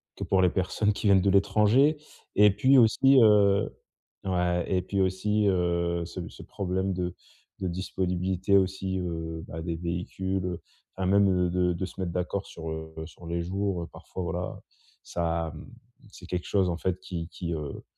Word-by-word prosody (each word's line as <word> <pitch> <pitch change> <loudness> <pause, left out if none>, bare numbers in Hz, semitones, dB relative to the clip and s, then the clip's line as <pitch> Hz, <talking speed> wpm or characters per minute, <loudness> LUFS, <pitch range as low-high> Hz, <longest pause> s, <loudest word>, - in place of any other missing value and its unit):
que - - -5
pour 95 -1 +2
les 90 - +5
personnes 100 +3 0
qui 105 - -6
viennent 95 -2 +6
de 100 - +2
l'étranger, 105 +9 +4 0.4
et 105 +1 +7
puis 135 +7 +4
aussi, 135 +4 +5
heu 100 -2 +5 0.5
ouais, 90 -2 +1
et 90 -1 +2
puis 100 +2 -3
aussi, 100 +3 +1
heu, 85 -2 +1
ce 90 0 -6
ce - - -13
problème 95 0 -2
de 90 -1 -3 0.4
de 95 - -2
disponibilité 95 +1 0
aussi, 95 0 0
heu, 80 -2 -4
bah, 80 +1 -6
des 85 0 -3
véhicules, 90 +2 -3
heu, 90 -2 -4 0.4
enfin, 95 - -1
même, 100 +1 +4
heu, 90 -1 +2
de 90 - -1
de 90 - +1
de 90 +2 -3
se 95 - -11
mettre 85 -2 -2
d'accord 90 +2 -2
sur, 80 -1 -7
heu, 80 0 -6
sur 85 +1 -13
les 85 0 -1
jours, 95 0 -2
heu, - - -7
parfois, 95 - -7
voilà 85 +2 -4 0.4
ça, 85 -1 -2
mmh, 75 - -10 0.4
c'est 90 - -12
quelque 90 -1 -3
chose 95 -3 +2
en 85 - -2
fait 95 +1 -2
qui 85 -3 -5
qui, 85 +1 -5
heu, 75 -3 -5
90 Hz, 185 wpm, -27 LUFS, 85-100 Hz, 0.5 s, et